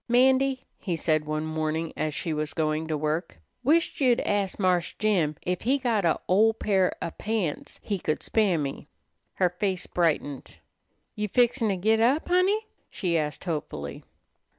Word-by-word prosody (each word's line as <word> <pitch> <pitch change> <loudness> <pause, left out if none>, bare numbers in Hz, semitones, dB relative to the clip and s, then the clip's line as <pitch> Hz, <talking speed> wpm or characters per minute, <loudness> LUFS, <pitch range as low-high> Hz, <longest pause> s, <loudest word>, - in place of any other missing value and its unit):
"'Mandy," 260 +2 +3
he 180 -5 -2
said 155 -1 +1
one 155 +1 -2
morning 155 +1 -2
as 155 -1 -2
she 165 -3 -2
was 150 -1 -3
going 155 0 0
to 155 -1 -1
work, 155 - -2 0.3
"wished 320 +3 +2
you'd 250 -3 +4
ast 200 -2 -1
Marse 180 -3 +1
Jim 180 -8 +1
ef 180 0 -1
he 260 +5 +2
got 235 -7 0
a' 165 - +2
ol' 220 +4 +4
pair 190 -4 +2
of 165 - -6
pants 210 -8 -2
he 200 -3 -2
could 155 -2 -2
spare 205 -6 +2
me." 140 -3 -4 0.5
Her 180 -2 +2
face 185 0 -2
brightened. 150 -5 -1 0.6
"You 210 0 -2
fixin' 240 +1 +2
to 195 - +1
git 220 +5 +2
up, 260 +9 +2
Honey?" 380 +5 +3 0.2
she 175 -4 -1
asked 150 -3 -1
hopefully. 145 - -4
180 Hz, 165 wpm, -26 LUFS, 155-225 Hz, 0.6 s, you'd